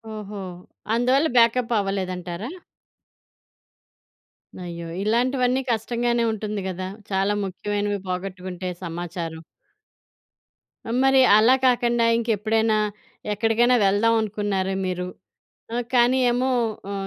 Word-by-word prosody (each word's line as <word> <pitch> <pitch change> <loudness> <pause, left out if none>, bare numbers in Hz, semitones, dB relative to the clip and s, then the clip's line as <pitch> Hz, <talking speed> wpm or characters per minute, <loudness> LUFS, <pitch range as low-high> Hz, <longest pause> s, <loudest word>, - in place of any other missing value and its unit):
ఓహో! 205 -1 -7 0.5
అందువల్ల 255 +6 +3
బాకప్ 235 +1 +4
అవ్వలేదంటారా? 185 0 -3 2.2
అయ్యో! 170 -1 -6 0.2
ఇలాంటివన్నీ 250 +3 +1
కష్టంగానే 235 +1 0
ఉంటుంది 210 -1 -4
కదా! 185 0 -4 0.2
చాలా 195 +2 +1
ముఖ్యమైనవి 205 +2 -2
పోగొట్టుకుంటే 185 0 -4
సమాచారం. 170 -1 -5 1.6
మరి 270 0 +5 0.2
అలా 235 +5 +6
కాకండా 240 -1 +3
ఇంకెప్పుడైనా, 220 -1 +1 0.6
ఎక్కడికైనా 225 +4 +3
వెళ్దాం 205 +4 +3
అనుకున్నారా 205 -3 -1
మీరు? 180 0 -3 0.7
ఆ - - 0 0.2
కానీ 245 +1 +4
ఏమో 255 +2 0 0.4
ఆ! - - -3
210 Hz, 90 wpm, -23 LUFS, 190-240 Hz, 2.2 s, అలా